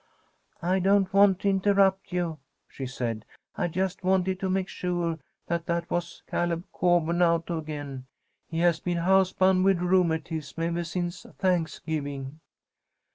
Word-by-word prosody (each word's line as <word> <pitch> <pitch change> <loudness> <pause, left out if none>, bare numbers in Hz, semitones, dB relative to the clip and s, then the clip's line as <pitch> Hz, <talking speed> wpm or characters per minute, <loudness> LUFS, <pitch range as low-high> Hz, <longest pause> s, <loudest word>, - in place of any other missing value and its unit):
"I 185 +2 +2
don't 195 0 +3
want 195 -2 +5
to 200 - +2
interrupt 195 0 +2
you," 175 -3 -2 0.3
she 135 - -6
said; 115 -4 -3 0.3
"I 195 -4 0
just 185 +3 -2
wanted 185 0 +1
to 190 - -1
make 190 0 0
sure 175 -3 -2 0.3
that 170 0 -2
that 170 0 -2
was 175 0 -3
Caleb 175 -1 -1
Coburn 175 -1 +2
out 170 0 +2
again. 145 -5 -5 0.4
He 165 0 -2
has 170 -2 +3
been 175 +1 -2
house 190 +2 +3
bound 185 0 +3
with 195 -1 +4
rheumatism 165 -4 0
ever 170 +1 -1
since 175 +1 -4
Thanksgiving." 155 -5 -2
175 Hz, 140 wpm, -27 LUFS, 160-190 Hz, 0.4 s, want